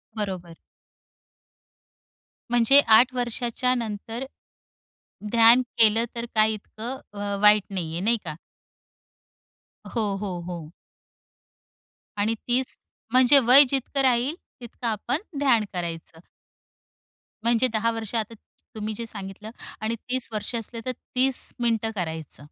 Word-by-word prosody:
बरोबर. 185 -5 -5 1.9
म्हणजे 245 +4 +5 0.2
8 255 +2 +3
वर्षाच्यानंतर 240 -1 -2 1.1
ध्यान 235 +2 +6 0.2
केलं 225 +1 +5
तर 235 0 -4
काही 215 0 +3
इतकं 230 +5 -7 0.2
अ, 200 0 -2
वाईट 210 -1 +6
नाहीये, 170 -3 -3
नाही 230 +5 +2
का? 155 -2 -5 1.6
हो, 210 -4 -1
हो, 190 -3 -4
हो. 170 -3 -8 1.5
आणि 215 +2 +1
30 250 +1 +1 0.3
म्हणजे 255 +3 +6
वय 260 +5 +9
जितकं 275 +1 -1
राहील, 260 +4 +2 0.3
तितकं 240 0 -7
आपण 240 - -2 0.2
ध्यान 240 -7 +3
करायचं. 165 -2 -6 1.2
म्हणजे 235 +2 +3
10 230 +1 +1
वर्ष 225 -1 -5
आता 225 0 -2 0.4
तुम्ही 215 0 -4
जे 235 - -5
सांगितलं 200 +1 -8 0.3
आणि 225 +1 -1
30 255 -1 -1
वर्ष 215 +3 -4
असले, 230 +1 -5
तर 255 - -1 0.2
30 260 0 +3
मिनिटं 225 -2 0
करायचं. 160 -6 -5
225 Hz, 110 wpm, -24 LUFS, 205-245 Hz, 1.9 s, वय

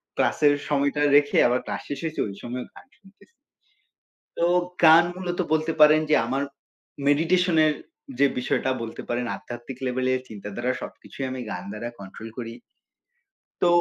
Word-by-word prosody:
ক্লাসের 145 -1 +3 0.2
সময়টা 145 0 +1
রেখে 145 0 +4
আবার 125 +1 +1
ক্লাস - - -4
শেষ 140 -1 -4
হয়েছে। 160 -1 -4
ওই 100 - -7
সময় 125 +1 -4
গান - - -14
শুনতেছি। 195 0 -21 1.1
তো 170 - +2 0.4
গান 160 +1 +9
মূলত 180 -1 -4
বলতে 160 +1 +1
পারেন 155 +1 +7
যে 150 - +5
আমার 135 +4 -1 0.6
মেডিটেশন 170 +4 +3
এর 155 - +3 0.5
যে 140 - +6
বিষয়টা 125 +1 0
বলতে 115 -1 -6
পারেন 120 +1 -1
আধ্যাত্মিক 120 +5 -9
লেভেলে 130 0 0
চিন্তার 105 -1 -8
দ্বারা 125 +2 0
সবকিছুই 135 - -7
আমি 130 - -5
গান 90 -1 -5
দ্বারা 115 +3 -5
কন্ট্রোল 100 +3 -9
করি। 115 -2 -5 1.1
তো 180 - +4
135 Hz, 150 wpm, -25 LUFS, 120-155 Hz, 1.1 s, গান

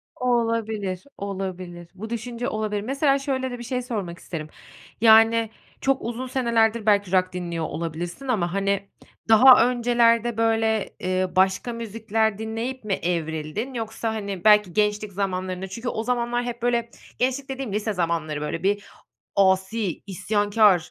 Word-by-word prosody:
Olabilir, 225 -6 -1
olabilir. 185 -3 -5
Bu 220 +4 -7
düşünce 235 +1 -4
olabilir. 215 -2 -2
Mesela, 275 +4 +1
şöyle 260 -2 -2
de 245 - -5
bir - - -6
şey 250 +1 -2
sormak 200 -8 -5
isterim. 155 -4 -6 0.5
Yani, 225 0 +6 0.3
çok 270 0 +1
uzun 240 +2 -4
senelerdir 235 -3 +1
belki 205 -3 +3
rock 185 -1 +2
dinliyor 170 -3 -3
olabilirsin. 170 - -5
Ama, 185 -8 0
hani, 195 0 -1 0.4
daha 245 +2 +8
öncelerde 235 -1 +2
böyle, 225 -1 +1
eee, 185 0 0
başka 190 +5 +2
müzikler 220 -1 -1
dinleyip 225 +3 -4
mi 205 -2 -1
evrildin? 170 - -3
Yoksa, 225 -1 -3
hani, 200 -4 -5
belki 210 -4 +5
gençlik 210 -1 0
zamanlarında 185 -1 -3
çünkü 230 +6 -5
o 220 - -3
zamanlar 240 0 0
hep 240 -1 -5
böyle 235 -1 0 0.3
gençlik 265 +2 0
dediğim 265 -6 -4
lise 215 0 -1
zamanları 165 -4 -1
böyle 150 +3 -4
bir 205 +1 +1 0.5
asi, 190 0 +1
isyankâr, 205 +1 +3
215 Hz, 140 wpm, -24 LUFS, 190-235 Hz, 0.5 s, daha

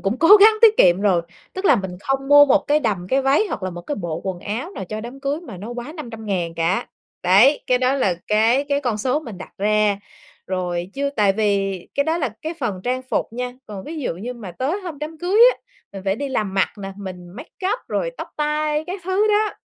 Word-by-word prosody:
cũng 200 +6 -1
cố 330 - +3
gắng 435 +2 +9
tiết 440 -1 +7
kiệm 180 +1 +5
rồi, 190 -4 +2 0.3
tức 375 - -6
là 290 - +6
mình 190 -3 -4
không 270 +4 -2
mua 290 0 +8
một 270 - +3
cái 300 +1 +3
đầm, 200 -9 -1
cái 270 +4 +2
váy 280 +10 +3
hoặc - - -5
là 185 - -2
một 175 0 -7
cái 290 - -4
bộ 170 -4 -4
quần 185 -2 -4
áo 230 - -4
nào 390 - -6
cho 215 +4 -5
đám 245 +4 -9
cưới 280 +3 -2
mà 240 - -10
nó 205 +6 -8
quá 240 +4 -6
500.000 220 - -4
cả, 170 +3 0 0.4
đấy, 205 +11 +5
cái 250 - +3
đó 255 +1 +2
là 205 -10 +1
cái 225 +6 +3
cái 285 0 +1
con 245 -6 -1
số 255 +7 0
mình 230 - -9
đặt 185 - -10
ra. 210 0 +2 0.5
Rồi 180 -1 -3
chứ 280 0 -1
tại 205 -3 +4
vì 195 -2 0 0.2
cái 280 - +1
đó 320 +2 0
là 280 -6 0
cái 320 +2 -4
phần 205 -7 -2
trang 255 +1 -1
phục 255 - -1
nha, 250 +1 -4
còn 200 -3 -8
ví 320 +2 -6
dụ 250 - -2
như 220 +8 -6
mà 210 -7 -9
tới 275 - -2
hôm 345 -6 -7
đám 310 +2 -6
cưới 360 +5 0
á, - - -14 0.4
mình 195 - -8
phải 195 0 0
đi 285 +3 -3
làm 210 -7 -2
mặt 195 - +2
nè, 195 -1 -6
mình 185 -3 -8
makeup 345 - -4
rồi - - -1
tóc - - -6
tai 300 0 0
các 370 +2 -5
thứ 380 +3 +1
đó, 425 0 +2
245 Hz, 240 wpm, -21 LUFS, 195-295 Hz, 0.5 s, gắng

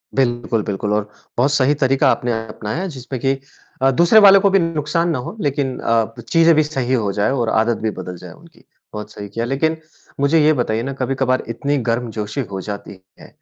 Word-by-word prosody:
बिल्कुल, 120 -4 0
बिल्कुल 105 +1 -2
और 105 0 -1 0.3
बहुत 135 +4 +3
सही 145 0 +3
तरीका 135 +1 +3
आपने 120 -1 -1 0.2
अपनाया 110 - -4
जिसमें 130 0 -6
कि 135 0 0 0.4
अ, 135 - +4
दूसरे 170 - +5
वाले 195 -1 +8
को 200 +1 +3
भी 195 - +4
नुकसान 165 +1 0
ना 155 - 0
हो 130 - -7
लेकिन 140 -4 -1
अ, 115 -1 0 0.2
चीज़ें 165 0 +5
भी 155 - +4
सही 135 -4 -2
हो 105 -5 +1
जाए 105 +6 +1
और 120 -4 0
आदत 110 +1 +1
भी 110 - 0
बदल 90 -2 -7
जाए 90 - -11
उनकी। 165 0 -18 0.3
बहुत 105 0 -7
सही 105 -1 -8
किया, 115 +3 -3
लेकिन 160 +5 0 0.4
मुझे 140 +3 +3
ये 155 - +5
बताइए 115 -4 -1
ना 135 +1 -4
कभी-कभार 130 0 -1
इतनी 140 +5 -1
गर्मजोशी 115 0 -2
हो 95 - -4
जाती 100 0 -7 0.3
है, - - -13
130 Hz, 200 wpm, -19 LUFS, 110-150 Hz, 0.4 s, वाले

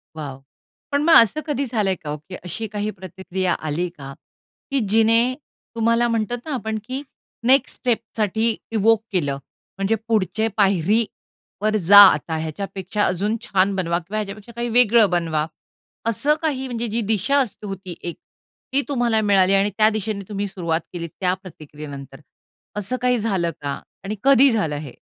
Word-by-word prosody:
Wow! 140 -4 -7 0.5
पण 285 0 +1
मग 330 - +5
असं 230 +7 +6
कधी 280 -2 -1
झालंय 210 -6 0
का 150 -3 -9
हो 150 - -3
की 170 +5 -11
अशी 220 +6 -4
काही 210 0 -3
प्रतिक्रिया 185 -1 -3
आली 170 +4 -1
का 135 -1 -8 0.6
की 275 - +2
जिने 225 +2 +5 0.5
तुम्हाला 230 +1 +2
म्हणतात 230 +1 -1
ना 310 - -3
आपण 220 -3 -3
की 260 +4 -4 0.5
नेक्स्ट 265 0 +4
स्टेपसाठी 225 -2 0 0.2
इव्होक 225 0 +3
केलं? 145 -8 0 0.4
म्हणजे 195 +3 +1
पुढचे 220 0 +1
पायरीवर 205 +2 0
जा 200 0 +10
आता 155 +2 -4
ह्याच्यापेक्षा, 190 +5 -3
अजून 195 +4 0
छान 195 -4 +1
बनवा 170 -2 0
किंवा 195 +5 -6
ह्याच्यापेक्षा 210 +2 -6
काही 235 0 -2
वेगळं 230 -3 +5
बनवा 165 -3 0 0.6
असं 290 +7 +2
काही 275 -5 -1
म्हणजे 235 -1 -2
जी 230 +2 -1
दिशा 220 +8 +1
असते 215 -5 -3
होती 190 -2 -7
एक 175 - -5 0.6
ती 280 - +3
तुम्हाला 240 -5 +1
मिळाली 195 -2 +3
आणि 195 +1 +3
त्या 215 0 +5
दिशेने 215 -2 -3
तुम्ही 205 -1 -2
सुरुवात 170 -4 -2
केली 170 -1 -4
त्या 180 +2 -1
प्रतिक्रियेनंतर? 150 -7 -10 0.6
असं 210 +5 -1
काही 250 0 +2
झालं 190 -6 0
का 140 -1 -3 0.2
आणि 205 +2 -4
कधी 275 0 +6
झालं 185 -10 0
हे? 145 -4 -8
205 Hz, 160 wpm, -22 LUFS, 180-230 Hz, 0.6 s, जा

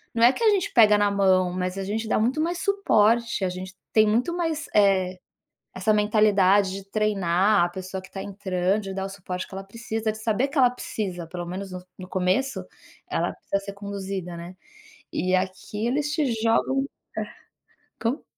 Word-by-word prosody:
não 230 - +2
é 245 +3 +7
que 470 - -4
a 440 - +6
gente 400 -1 0
pega 215 -3 +7
na 205 0 +3
mão, 185 -2 +3
mas 185 +1 -2
a 195 - -2
gente 220 +3 -2
dá - - +2
muito 250 +8 +1
mais 340 +2 -1
suporte, 235 - +2
a - - 0
gente 185 +1 -7 0.2
tem 215 -1 +6
muito 240 +11 +1
mais, 325 -2 -2
eh, 190 -3 +3 0.6
essa 215 - +2
mentalidade 205 -2 +4
de 195 0 -6
treinar 200 -2 +2
a - - -3
pessoa 185 +1 -6
que 185 - -15
tá 195 - -5
entrando, 190 0 -1
de 195 -1 -5
dar 190 0 -2
o - - -5
suporte 185 -2 -6
que - - -16
ela 195 - -5
precisa, 220 +1 -3
de 215 - -9
saber 225 +4 +1
que 290 - -5
ela 255 -2 +6
precisa, 185 -8 -5
pelo 175 0 -6
menos 190 +2 -6
no 180 0 -7 0.2
no 185 - -8
começo, 190 +9 0 0.5
ela - - -1
precisa 200 - -2
ser 200 - -6
conduzida, 195 -3 -5
né, 175 +2 -9 0.6
e 185 +1 0
aqui 190 +4 -3
eles 295 +3 0
te 300 -3 +1 0.2
jogam 265 +4 +2 0.3
é. - - 0 0.8
Como? 240 +6 -1
200 Hz, 195 wpm, -25 LUFS, 185-230 Hz, 0.8 s, é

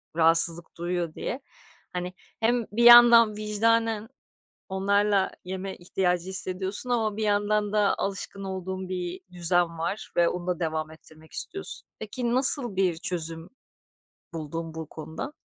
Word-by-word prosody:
rahatsızlık 165 +1 +5
duyuyor 175 -1 -3
diye. 255 - -5 0.5
Hani, 180 0 -5 0.3
hem 235 +1 0
bir 235 +3 0
yandan 235 -2 +8
vicdanen 220 +1 0 0.6
onlarla 200 +1 +1
yeme 190 +1 -6
ihtiyacı 180 0 -2
hissediyorsun 190 +4 -2
ama 220 -4 -1
bir 220 - -2
yandan 205 0 0
da 210 -1 +2
alışkın 195 0 -5
olduğun 190 -1 -6
bir 180 0 -5
düzen 175 -1 +3
var 175 +6 -4
ve 170 -1 +4
onu 180 0 -6
da 180 -2 -2
devam 155 -1 -3
ettirmek 160 0 -16
istiyorsun. 390 +3 -3
Peki, 235 +2 -4
nasıl 255 -4 +4
bir 185 -3 0
çözüm 165 -2 -2 0.8
buldun 165 +1 -6
bu 160 -1 -7
konuda? 160 - -8
190 Hz, 130 wpm, -25 LUFS, 170-215 Hz, 0.8 s, yandan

